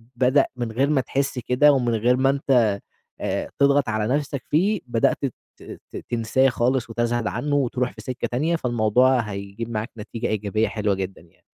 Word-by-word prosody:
بدأ 130 +3 +3
من 120 -2 -3
غير 135 +5 +1
ما 145 -3 +3
تحس 135 0 -2
كده 125 +5 +4
ومن 120 -3 +1
غير 120 +3 +2
ما 135 +1 +3
أنت 125 -7 +2 0.4
آآ - - -2
تضغط 140 -2 +3
على 110 +3 0
نفْسك 145 -2 -3
فيه، 195 +6 +2
بدأت 115 -2 +2
ت 130 - -3 0.6
ت - - -6
تنساه 120 +3 +2
خالص 125 0 0
وتزهد 120 0 -1
عنه 145 +7 -1
وتروح 125 -2 0
في - - -11
سكّة 130 -1 -4
تانية، 155 +8 +1
فالموضوع 125 -1 +2
هيجيب 100 +1 -5
معاك 110 +1 -3
نتيجة 115 +2 -4
إيجابية 110 +1 0
حلوة 105 -2 0
جدًا 95 0 -5
يعني. 85 +2 -25
120 Hz, 175 wpm, -23 LUFS, 110-135 Hz, 0.6 s, كده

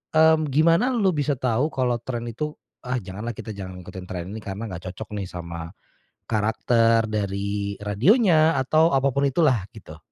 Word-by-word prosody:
mmm, 160 -1 +5
gimana 165 - +3
lu 195 -5 +3
bisa 145 -2 0
tahu 125 +2 +1
kalau 125 -5 -1
tren 120 -1 -4
itu, 150 +6 -4 0.2
"Ah 125 +1 -3
janganlah 105 +5 -6
kita 110 - -7
jangan 95 -3 -7
ngikutin 95 0 -9
tren 90 +1 -5
ini 110 - -6
karena 105 +1 -6
nggak 90 +1 -7
cocok 105 +4 -9
nih 95 - -4
sama 85 0 -7 0.5
karakter 115 +1 +2
dari 100 -1 -2
radionya 155 - +4
atau 155 +4 +3
apapun 140 +1 +2
itulah." 135 - +2
Gitu. 80 -8 -12
115 Hz, 160 wpm, -24 LUFS, 100-150 Hz, 0.5 s, mmm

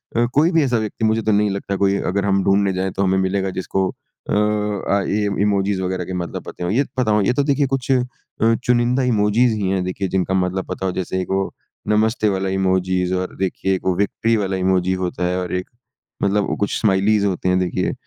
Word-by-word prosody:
अ, 120 +1 +3
कोई 155 +5 +4
भी 165 -3 +3
ऐसा 125 -3 +1
व्यक्ति 110 +1 -2
मुझे 110 +1 +2
तो 110 - 0
नहीं 105 0 +3
लगता 100 0 -3
कोई 100 0 +3 0.2
अगर 100 +1 0
हम 95 -1 +2
ढूँढने 100 0 +2
जाएँ, 95 +1 -1
तो 95 - -1
हमें 95 0 +2
मिलेगा, 95 +1 0
जिसको 95 0 -1 0.4
अ - - 0
अ, 105 -1 0
ये 105 +1 0 0.2
इमोजीस 100 -1 +1
वगैरह 95 -1 -2
के 95 - -6
मतलब 90 -1 -4
पते - - -8
हों। 90 - -1
ये 130 +7 +3
पता 125 -4 +2
हो 105 0 +3
ये 100 +5 +2
तो 145 - +1
देखिए 140 0 +1
कुछ 135 0 -1
अ, 130 - +4 0.6
चुनिंदा 125 +2 +2
इमोजीस 115 0 +3
ही 95 - 0
हैं 95 -1 0
देखिए 90 +2 -3
जिनका 95 0 -1
मतलब 95 0 0
पता 95 - -4
हो 95 - 0
जैसे 95 0 -3
एक 90 - -5
वो 95 0 -1 0.4
नमस्ते 110 +1 +2
वाला 95 -1 -1
इमोजीस 95 -1 0
और 90 0 -3
देखिए 95 0 0
वो 95 -1 +1
विक्ट्री 110 +3 +1
वाला 95 -2 -1
इमोजी 95 0 +1
होता 90 0 -2
है 90 +1 0
और 90 - -4
एक 90 0 -4 0.5
मतलब 100 0 +2
वो - - -1
कुछ 100 - -1
स्माइलीज़ 100 0 +2
होती 95 -1 0
हैं 90 0 +3
देखिए। 90 -1 -1
100 Hz, 225 wpm, -20 LUFS, 95-105 Hz, 0.6 s, कोई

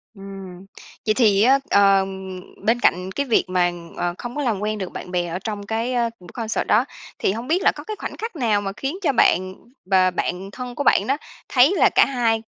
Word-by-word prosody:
Ừm, 195 -2 -10 0.4
vậy 215 - +3
thì 210 -5 +4
á, 265 +3 +5
ờ, 195 -1 +5 0.6
bên 230 +2 +3
cạnh 180 -3 +1
cái 280 +7 -2
việc 235 - +3
mà, 180 -1 +2 0.3
ờ, 175 0 -1
không 240 0 -7
có 295 - -2
làm 230 -8 0
quen 215 +1 -2
được 190 -3 -5
bạn 180 - -8
bè 175 -1 0
ở 170 +2 -4
trong 205 0 -5
cái, 225 +4 -2
ơ, 240 -1 +1
buổi 180 - -15
concert 225 -2 -2
đó, 230 +4 +4 0.3
thì - - +1
hông 230 +5 -5
biết 345 +4 +1
là - - +5
có - - -8
cái 430 - -5
khoảnh - - -6
khắc 450 -3 -5
nào 225 -8 +1
mà 195 -1 -3
khiến 275 +6 -3
cho 300 -7 +1
bạn 185 -5 +2 0.3
và 185 -1 +3
bạn 180 +2 -3
thân 250 +1 -7
của 285 - -2
bạn - - +3
đó 275 +2 +1 0.3
thấy 270 +6 +5
là - - +5
cả - - +7
hai, 230 -4 0
215 Hz, 230 wpm, -22 LUFS, 190-250 Hz, 0.6 s, cả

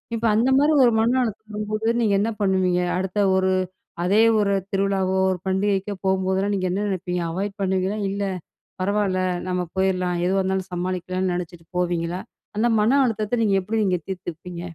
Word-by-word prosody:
இப்ப 230 +1 -2
அந்த 240 +4 +3
மாதிரி 295 +2 +4
ஒரு 240 - +5
மன 240 +3 +2
அழுத்தம் 220 -1 -5
வரும்போது 215 +2 -1
நீங்க 210 -3 +2
என்ன 225 - +1
பண்ணுவீங்க? 185 -2 +2 0.2
அடுத்த 190 +2 -2 0.2
ஒரு 190 0 +2 0.5
அதே 200 +5 +4 0.2
ஒரு 200 -1 +2 0.2
திருவிழாவோ, 195 -1 +1
ஒரு 185 - -1
பண்டிகைக்கோ 195 +1 0
போகும்போதெல்லாம் 190 +1 +1
நீங்க 185 -1 -1
என்ன 205 +3 -1
நினைப்பீங்க? 180 -2 -2
அவாய்ட் 195 +4 -3
பண்ணுவீங்களா? 190 +2 0
இல்ல 200 +1 -2 0.6
பரவாயில்ல, 195 -1 +1 0.3
நம்ம 180 0 0
போயிறலாம். 185 -2 +1
எதுவா 190 +1 +2
இருந்தாலும் 190 0 -2
சமாளிக்கலாம்னு 185 +1 -2
நினைச்சிட்டு 175 -1 -6
போவீங்களா? 175 0 -1 0.4
அந்த 235 +2 +3
மன 245 +7 +4
அழுத்தத்தை 220 0 -1
நீங்க 200 -2 +2
எப்படி 220 +3 -1
நீங்க 180 -2 +1
தீர்த்துப்பீங்க? 175 -1 -6
190 Hz, 160 wpm, -23 LUFS, 185-210 Hz, 0.6 s, ஒரு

